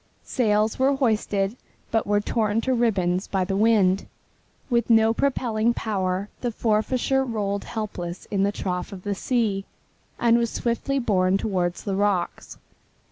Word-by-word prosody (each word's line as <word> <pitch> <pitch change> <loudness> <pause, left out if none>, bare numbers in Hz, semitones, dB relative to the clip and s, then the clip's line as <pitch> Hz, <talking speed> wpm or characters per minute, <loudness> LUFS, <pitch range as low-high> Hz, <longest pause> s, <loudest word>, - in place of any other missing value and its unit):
Sails 215 -2 +1
were 270 +2 +3
hoisted, 215 -5 0 0.4
but 225 -2 +1
were 205 0 +3
torn 215 0 0
to 260 +2 0
ribbons 195 -6 +1
by 190 -2 0
the 195 +1 -2
wind. 200 -3 +3 0.6
With 240 -2 +1
no 225 -1 +5
propelling 235 -3 0
power 190 -2 -1
the 245 - -1
Forfarshire 240 +5 +1
rolled 205 -5 -2
helpless 185 -6 -5
in 200 -2 +1
the 200 +1 +2
trough 180 -3 -3
of 190 -2 -9
the 205 - -1
sea, 210 -2 0 0.6
and 235 0 +4
was 235 -1 0
swiftly 240 +5 -1
borne 195 -6 +2
toward 180 -4 -1
the 200 -2 -4
rocks. 200 -3 -1
210 Hz, 145 wpm, -24 LUFS, 195-235 Hz, 0.6 s, no